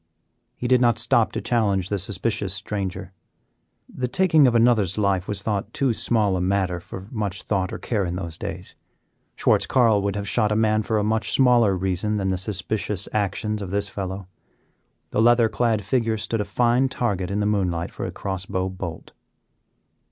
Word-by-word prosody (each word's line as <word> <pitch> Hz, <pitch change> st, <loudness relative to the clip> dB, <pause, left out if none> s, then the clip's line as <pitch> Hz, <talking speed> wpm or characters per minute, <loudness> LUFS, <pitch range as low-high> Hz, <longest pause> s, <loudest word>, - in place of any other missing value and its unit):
He 125 Hz, -, -4 dB
did 125 Hz, 0 st, +4 dB
not 120 Hz, -3 st, +3 dB
stop 110 Hz, 0 st, +3 dB
to -, -, -3 dB
challenge 100 Hz, -6 st, 0 dB
the 100 Hz, -, 0 dB
suspicious 100 Hz, +1 st, -1 dB
stranger. 95 Hz, -2 st, -4 dB, 0.7 s
The 125 Hz, -, -4 dB
taking 160 Hz, 0 st, +4 dB
of 120 Hz, -, +2 dB
another's 115 Hz, -6 st, +3 dB
life 100 Hz, -3 st, +1 dB
was 100 Hz, -1 st, -4 dB
thought 105 Hz, 0 st, -2 dB
too 135 Hz, -4 st, +1 dB
small 105 Hz, -4 st, +1 dB
a 90 Hz, -, -1 dB
matter 90 Hz, -1 st, 0 dB
for 95 Hz, +2 st, -9 dB
much 105 Hz, -6 st, -3 dB
thought 95 Hz, -3 st, -1 dB
or -, -, -4 dB
care 105 Hz, -5 st, -1 dB
in 90 Hz, -1 st, -3 dB
those 85 Hz, -3 st, -5 dB
days. -, -, -6 dB, 0.6 s
Schwartz -, -, +2 dB
Carl 115 Hz, -5 st, +3 dB
would 100 Hz, 0 st, -1 dB
have 100 Hz, 0 st, -4 dB
shot 105 Hz, 0 st, +1 dB
a -, -, +2 dB
man 110 Hz, 0 st, +2 dB
for 110 Hz, +1 st, -1 dB
a 105 Hz, -, +1 dB
much 110 Hz, +1 st, 0 dB
smaller 120 Hz, -7 st, +4 dB
reason 95 Hz, +3 st, -1 dB
than 95 Hz, -2 st, -1 dB
the 95 Hz, -, 0 dB
suspicious 100 Hz, 0 st, -3 dB
actions 105 Hz, +1 st, -1 dB
of 95 Hz, -, -5 dB
this 100 Hz, +1 st, -1 dB
fellow. 95 Hz, -1 st, -5 dB, 0.8 s
The 105 Hz, -, +1 dB
leather 120 Hz, 0 st, +5 dB
clad 110 Hz, -1 st, 0 dB
figure 115 Hz, -1 st, +1 dB
stood 110 Hz, +1 st, -2 dB
a -, -, -2 dB
fine 120 Hz, +5 st, +2 dB
target 100 Hz, -8 st, -2 dB
in 100 Hz, +1 st, -1 dB
the 105 Hz, -, 0 dB
moonlight 90 Hz, -5 st, 0 dB
for -, -, -5 dB
a -, -, -5 dB
cross 95 Hz, -1 st, -5 dB
bow 95 Hz, -1 st, -1 dB
bolt. 90 Hz, -3 st, -7 dB
105 Hz, 190 wpm, -23 LUFS, 95-115 Hz, 0.8 s, leather